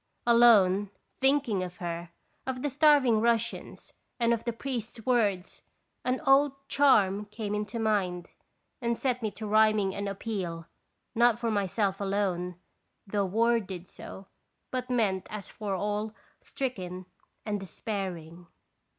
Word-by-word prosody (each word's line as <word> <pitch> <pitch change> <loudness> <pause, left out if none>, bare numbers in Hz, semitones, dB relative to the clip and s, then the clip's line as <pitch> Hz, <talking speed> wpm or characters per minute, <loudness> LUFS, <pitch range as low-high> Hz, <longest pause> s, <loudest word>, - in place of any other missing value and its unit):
Alone, 210 -5 +5 0.3
thinking 265 -7 +2
of 180 -1 -6
her, 170 0 -5 0.4
of 255 -1 -3
the 290 - 0
starving 275 -6 +5
Russians, 235 0 -1 0.3
and 235 0 +3
of 230 - -3
the 235 - 0
priest's 235 -2 -5
words, 205 -7 +1 0.4
an 255 +1 0
old 275 +1 +5
" - - -45
charm" 210 -9 +4
came 210 0 -5
into 210 +3 -3
mind, 195 -6 0 0.5
and 235 -1 0
set 250 -1 -1
me 220 - -1
to 210 +2 -8
rhyming 215 -2 +3
an 200 +1 -3
appeal, 190 -5 -4 0.5
not 235 -1 +4
for 235 -1 -1
myself 200 -1 0
alone, 190 -3 -1 0.5
though 200 -1 0
worded 205 -4 0
so, 190 - -10 0.5
but 255 0 -3
meant 210 -7 0
as 210 -3 -7
for 205 -3 -4
all 210 +3 -2 0.2
stricken 185 -9 -5 0.4
and 210 -2 -1
despairing. 180 -3 -5
210 Hz, 135 wpm, -29 LUFS, 190-235 Hz, 0.5 s, Alone